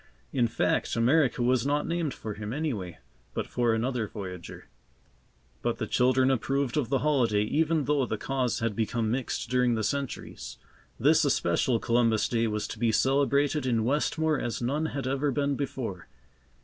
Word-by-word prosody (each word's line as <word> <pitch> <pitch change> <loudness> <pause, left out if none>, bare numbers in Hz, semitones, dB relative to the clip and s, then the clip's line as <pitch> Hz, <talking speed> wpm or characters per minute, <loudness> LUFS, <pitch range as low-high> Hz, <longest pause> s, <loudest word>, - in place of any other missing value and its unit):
In 125 -3 +2
fact, 115 0 0
America 130 +2 +3
was 125 -1 +2
not 145 +2 0
named 165 -3 -1
for 110 -4 -6
him, 105 +1 -6
anyway, 120 - -3 0.4
but - - -1
for 120 -1 0
another 115 0 -1
voyager. 95 -4 -8 0.9
But - - -1
the - - -2
children 130 +1 +3
approved 135 0 0
of 145 -6 0
the 135 - +2
holiday 120 -9 +2
even 155 +6 +1
though 140 -3 +1
the 110 - -2
cause 125 -2 -1
had 115 -2 -1
become 110 0 -1
mixed 125 -1 -3
during 125 -2 +3
the 110 - -1
centuries. 140 +5 -4 0.4
This - - +4
especial 100 +8 +2
Columbus 115 -1 +2
Day 115 -1 +1
was 105 -1 -2
to 110 - -7
be 115 -1 +2
celebrated 140 +3 +2
in 115 -3 +1
Westmore 150 +3 +1
as 120 - -3
none 145 +6 -1
had 140 -4 -4
ever 135 +2 0
been 140 +1 0
before. 125 -9 -4
125 Hz, 165 wpm, -28 LUFS, 115-140 Hz, 0.9 s, This